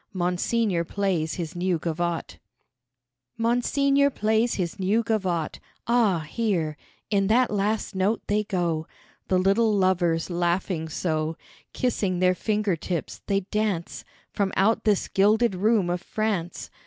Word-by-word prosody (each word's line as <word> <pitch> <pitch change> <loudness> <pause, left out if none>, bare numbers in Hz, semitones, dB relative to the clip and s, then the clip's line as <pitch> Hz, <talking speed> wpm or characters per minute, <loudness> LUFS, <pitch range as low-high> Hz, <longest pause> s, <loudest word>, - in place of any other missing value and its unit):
Monseigneur 180 +1 0
plays 175 -4 -1
his 170 -1 -5
new 180 0 0
gavotte. 170 +1 -3 1.0
Monseigneur 275 +4 +2
plays 220 -1 +1
his 175 -2 -3
new 205 +5 +2
gavotte 185 -8 -1 0.3
Ah, 225 -8 +2
hear 175 -7 -1 0.4
in 195 -2 +2
that 240 +3 +3
last 210 +1 -1
note 195 +4 +1
they 210 +1 +1
go 175 -6 -1 0.4
The 185 - +2
little 200 +5 +3
lovers 180 -4 +1
laughing 175 -1 -1
so; 155 0 -2 0.3
Kissing 205 -7 -1
their 185 0 +3
finger 210 0 0
tips, 165 0 -4
they 195 0 +1
dance 200 -3 -2 0.3
From 200 -2 0
out 215 +4 +2
this 210 -3 +2
gilded 215 +3 +3
room 205 0 +2
of 175 0 -1
France. 195 -4 -3
195 Hz, 130 wpm, -25 LUFS, 175-215 Hz, 1.0 s, that